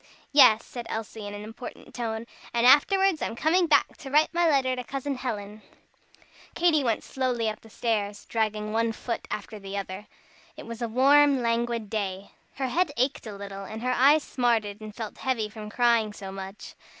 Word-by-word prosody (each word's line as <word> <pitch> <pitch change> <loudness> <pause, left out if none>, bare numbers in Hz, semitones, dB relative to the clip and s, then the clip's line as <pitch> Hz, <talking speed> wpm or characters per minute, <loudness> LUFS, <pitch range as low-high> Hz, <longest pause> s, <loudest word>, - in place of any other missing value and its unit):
"Yes," 225 -6 +6
said 240 -2 -7
Elsie, 220 -1 -5
in 205 - -6
an 205 - -7
important 225 +3 -10
tone, 225 -2 -3 0.3
"And 235 0 +3
afterwards 370 +6 +5
I'm - - -2
coming 340 +7 +2
back 310 - +3
to 270 - -9
write 300 +4 +3
my 340 -1 +3
letter 265 -3 +2
to 250 - -5
Cousin 275 +3 -3
Helen." 215 -5 -5 0.9
Katy 330 -4 +3
went 230 -3 0
slowly 250 -4 -1
up 215 0 -3
stairs, 210 -2 -2
dragging 215 -1 -1
one 230 0 +1
foot 230 +1 -5
after 210 +1 -5
the 195 0 -6
other. 195 +1 -6 0.5
It - - -9
was 230 +1 -8
a 235 - 0
warm, 275 +2 +5
languid 235 -1 0
day. 200 -2 -4 0.2
Her 265 -1 -2
head 340 +3 +1
ached 255 -1 0
a 210 - -6
little, 200 0 -7
and 220 +3 -7
her 250 - +1
eyes 285 +4 +5
smarted 225 -5 0
and 215 -1 -9
felt 220 -2 -7
heavy 235 -5 -1
from 210 0 -8
crying 230 -2 +2
so 195 -2 -8
much. 195 +1 -8
230 Hz, 185 wpm, -27 LUFS, 210-265 Hz, 0.9 s, Yes